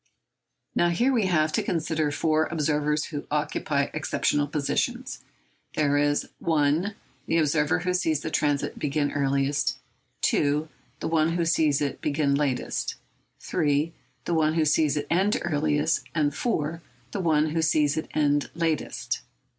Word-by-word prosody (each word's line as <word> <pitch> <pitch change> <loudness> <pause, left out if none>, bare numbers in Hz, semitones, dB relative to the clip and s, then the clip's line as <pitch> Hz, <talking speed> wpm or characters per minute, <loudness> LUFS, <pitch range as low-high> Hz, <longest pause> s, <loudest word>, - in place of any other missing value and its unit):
Now, 175 - +3
here 240 +11 +2
we 220 -6 +2
have 155 -3 +2
had - - -17
to - - +2
consider 160 -2 -1
four 155 +1 +1
observers 150 -1 0
who 145 - -4
occupy 145 -1 0
exceptional 145 -1 0
positions. 145 -1 -2 0.6
There 145 -2 +2
is 145 0 +1
(1) 160 +5 +1 0.3
the 165 - +2
observer 150 -1 +2
who 180 0 0
sees 160 -5 +1
the 160 - -4
transit 145 -2 0
begin 145 0 0
earliest, 140 0 0 0.5
(2) 150 +2 +2 0.3
the - - -1
one 160 0 +2
who 170 -1 0
sees 155 -3 +2
it 140 -2 -2
begin 145 -1 +1
latest, 140 -3 -1 0.5
(3) 155 -1 0 0.3
the 175 - -1
one 155 -1 +2
who 160 -2 +2
sees 150 0 +2
it 145 - -2
end 190 +5 +3
earliest, 150 -1 +1
and 150 -2 +2
(4) 165 -6 -2 0.3
the 205 - -3
one 155 -2 +2
who 165 +1 0
sees 150 -2 +2
it 155 - -3
end 145 -1 +2
latest. 165 -2 -2
155 Hz, 150 wpm, -26 LUFS, 145-165 Hz, 0.6 s, Now